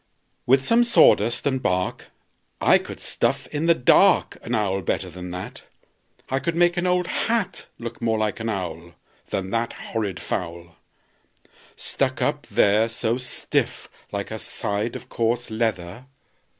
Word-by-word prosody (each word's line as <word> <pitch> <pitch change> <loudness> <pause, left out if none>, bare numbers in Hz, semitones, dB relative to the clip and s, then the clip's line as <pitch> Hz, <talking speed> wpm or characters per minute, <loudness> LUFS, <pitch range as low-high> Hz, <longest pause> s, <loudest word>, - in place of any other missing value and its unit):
"With 130 +1 +4
some 235 +1 +4
sawdust 120 - +4
and 130 -2 +1
bark 90 -3 -1 0.5
I - - +5
could - - -9
stuff - - 0
in 150 +3 -1
the 170 - +6
dark 125 - +4
An - - -2
owl 95 -2 0
better 90 +1 -2
than 90 +1 -8
that. 90 +1 -7 0.7
I 135 - 0
could 165 +5 -2
make 175 0 +4
an 175 0 0
old 180 0 +2
hat 200 -2 -1
Look 115 0 -7
more 115 -1 +1
like 110 +1 -1
an 115 0 -2
owl 85 -4 -5 0.3
Than 95 0 -3
that 115 +1 -1
horrid 100 -7 -4
fowl, 85 -1 -5 1.0
Stuck - - -1
up - - -1
there 105 +3 +3
so 115 +1 -1
stiff 125 -1 -2 0.2
like 100 0 -4
a 110 - -4
side 105 +3 -2
of - - -8
coarse 120 +1 -1
leather. 110 0 -2
115 Hz, 150 wpm, -24 LUFS, 95-130 Hz, 1.0 s, the